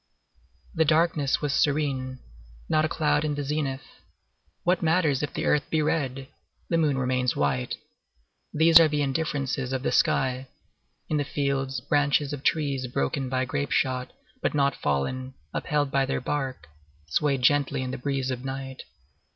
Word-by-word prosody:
The 160 -4 +3
darkness 155 -3 +2
was 145 -2 0
serene. 140 -4 0 0.5
Not 155 0 +2
a - - -1
cloud 150 -1 +1
in 150 -1 -1
the 145 - -3
zenith. 140 -2 -2 0.8
What 180 0 +2
matters 160 -4 +2
it 150 - -1
if - - -18
the - - -2
earth 150 - +1
be 160 - +1
red! 135 -4 -1 0.4
the 165 - +2
moon 150 -4 +2
remains 130 -1 0
white; 70 -3 0 0.7
these 160 +2 +7
are 165 - +6
the 150 -1 0
indifferences 135 -2 -1
of 130 -1 -2
the - - 0
sky. 130 0 +1 0.6
In 155 - 0
the 145 - +1
fields, 135 -2 -2
branches 145 0 +1
of 145 - -5
trees 140 -4 0
broken 125 - -1
by 130 0 0
grape 145 +3 -3
shot, 130 -2 0 0.3
but - - 0
not 140 -2 +2
fallen, 130 - -2 0.2
upheld 145 -2 0
by 135 -1 +2
their 135 - -1
bark, 130 - -3 0.4
swayed 135 - 0
gently 140 0 +2
in 130 - -4
the - - -5
breeze 135 0 -1
of 125 0 -4
night. 135 0 -5
140 Hz, 165 wpm, -26 LUFS, 130-150 Hz, 0.8 s, these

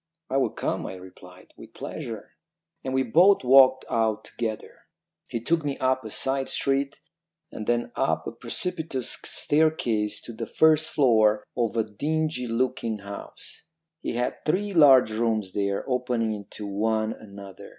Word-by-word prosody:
"'I 135 - +2
will 135 - +2
come,' - - -3
I - - -6
replied, 90 0 -14
'with - - -14
pleasure.' - - -7 0.5
"And 130 0 -3
we 130 - +2
both 175 - +5
walked 130 0 +6
out 110 -1 0
together. 110 -2 -6 0.4
He 115 - -3
took 160 +7 0
me 145 -2 -2
up 130 0 +1
a 110 - -7
side 135 +4 -2
street, 140 0 0 0.5
and 105 - -7
then 120 0 0
up - - 0
a - - -4
precipitous 160 -8 -2
staircase 135 -9 0
to 120 - -8
the - - -6
first 155 0 +3
floor 110 -6 +3
of 115 -2 -1
a 115 - +3
dingy 145 +5 -2
looking 115 -1 -1
house. 100 +8 -10 0.4
He - - -3
had 120 +1 -2
three 200 +6 0
large 135 -8 +7
rooms 110 -3 -1
there, 100 -1 -1
opening 125 -3 0
into 105 0 -8
one 110 +2 0
another. 100 -2 -12
120 Hz, 150 wpm, -26 LUFS, 110-135 Hz, 0.5 s, large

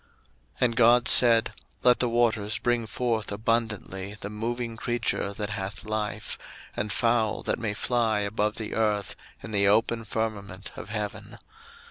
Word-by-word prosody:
01:001:020 - - -21
And 120 -2 +2
God 120 0 +5
said, 115 -2 +7 0.3
Let 125 -1 +5
the 125 - +1
waters 115 -3 +1
bring 120 -2 0
forth 110 -2 -2
abundantly 105 -2 -2
the 105 - -6
moving 115 +2 -3
creature 115 -3 -1
that 105 +1 -4
hath 100 +2 -5
life, 110 0 -3 0.4
and 105 0 -2
fowl 115 -1 +1
that - - -1
may 110 -3 -2
fly 115 -3 +1
above 105 +1 -1
the 110 - -5
earth 105 -3 0 0.3
in 110 - -7
the 100 -1 +3
open 115 +2 +2
firmament 105 -3 -4
of - - -9
heaven. 105 -1 -5
110 Hz, 150 wpm, -27 LUFS, 105-115 Hz, 0.4 s, said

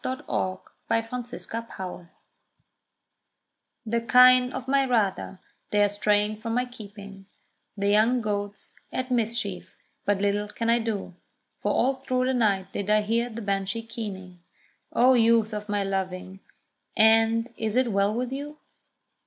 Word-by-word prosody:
THE 260 0 -2
KINE - - -16
OF 185 0 -2 0.3
MY 225 - +2
FATHER 230 -6 -6 1.8
The 230 +1 0
kine 250 +2 +6
of 260 -1 -6
my 275 +1 +3
rather, 210 -6 0 0.3
they 205 0 +3
are 205 - +3
straying 210 +1 +1
from 230 -1 -2
my 250 +1 +1
keeping; 200 -5 -11 0.5
The 200 0 0
young 220 +5 +4
goat's 205 -2 -4 0.2
at 255 0 -3
mischief, 235 -1 -2 0.3
but 205 - +1
little 205 +1 0
can 230 +2 -1
I 235 - +3
do: 220 -5 -3 0.5
For - - 0
all 265 +3 +2
through 255 -1 -1
the 260 - +1
night 200 -6 +1
did 200 0 -3
I 215 0 +4
hear 230 +3 0
the 230 0 -7
Banshee 195 +2 -2
keening; 190 -6 -7 0.5
O 255 +2 +5
youth 230 -2 +3
of 210 0 -5
my 205 -1 0
loving, 190 -1 -4 0.6
and 225 +2 +4
is 220 +1 -2
it 255 -2 +2
well 200 +1 +2
with 245 +3 -2
you? 290 +3 -6
220 Hz, 150 wpm, -26 LUFS, 200-240 Hz, 1.8 s, kine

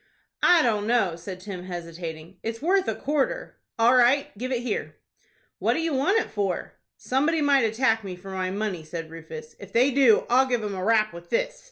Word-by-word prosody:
"I 345 -3 +6
don't 210 -3 +1
know," 225 -8 +2
said 180 +2 -8
Tim, 185 -2 -7
hesitating. 170 -1 -7
"It's 225 0 -4
worth 375 +6 +2
a - - 0
quarter." 300 - -2 0.2
"All 235 +2 +5
right. 255 +2 +3
Give 255 +5 -5
it 245 -2 -1
here." 235 -4 -3 0.6
"What - - +1
do - - -1
you 325 -1 -1
want 285 +11 +2
it - - -1
for?" 200 -3 -2 0.2
"Somebody 295 +6 +1
might 280 -4 +4
attack 225 0 +1
me 190 -2 -6
for 190 +2 -10
my 185 -1 -2
money," 195 -3 -3
said 160 0 -7
Rufus. 460 - -9
"If - - -12
they 250 +4 +4
do, 255 -5 +4
I'll 260 +2 +4
give 245 -3 0
'em 205 -1 -3
a 185 -1 -4
rap 215 -1 +2
with 170 0 -11
this." - - -1
225 Hz, 205 wpm, -25 LUFS, 185-265 Hz, 0.6 s, I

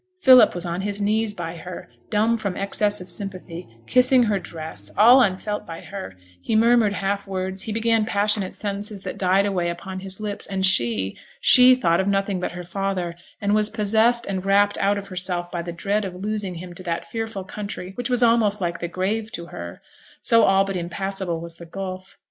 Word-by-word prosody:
Philip 255 - +7
was 175 0 -4
on 175 +1 -3
his 205 +1 -3
knees 215 +1 +1
by 170 -1 -5
her, 180 +3 -8 0.2
dumb 220 +2 +2
from 200 -5 -3
excess 205 0 0
of 180 - -9
sympathy, 185 -3 -5 0.2
kissing 250 0 +4
her 210 -3 +1
dress, 155 - -7
all 240 +5 +8
unfelt 205 0 -1
by 165 0 -7
her; 195 - -8 0.3
he 220 - -1
murmured 230 -2 +4
half 200 +1 -2
words, 190 0 -3
he 220 - -4
began 225 0 +2
passionate 205 -2 0
sentences 205 0 -4
that - - -7
died 190 +1 +3
away 180 -4 0
upon 185 +2 -6
his 190 +1 -5
lips; 210 -1 -3
and 190 -1 0
she 115 - +2 0.2
she 255 0 +7
thought 170 -9 +2
of 190 - 0
nothing 195 -1 0
but 180 - -3
her 180 0 -6
father, 185 -1 -3 0.3
and 205 -1 0
was 210 0 +2
possessed 220 +2 +2
and 190 -2 -3
rapt 200 +1 +3
out 200 +1 +2
of 200 0 -7
herself 180 -1 -2
by 175 - -3
the 170 0 -6
dread 200 +5 -1
of 185 -2 -5
losing 200 -1 -3
him 175 +1 -8
to 175 - -10
that 170 -2 -3
fearful 225 -4 -5
country 190 -1 -7
which 245 +4 -4
was 245 -1 +2
almost 225 -3 +3
like 175 -2 -2
the 170 - -3
grave 210 +5 -2
to 170 - -6
her, 85 0 -8 0.4
so 230 0 +4
all 195 0 +4
but 195 -1 -4
impassable 180 0 -3
was 170 0 -8
the 170 - -10
gulf. 185 +1 -7
195 Hz, 200 wpm, -23 LUFS, 180-210 Hz, 0.4 s, all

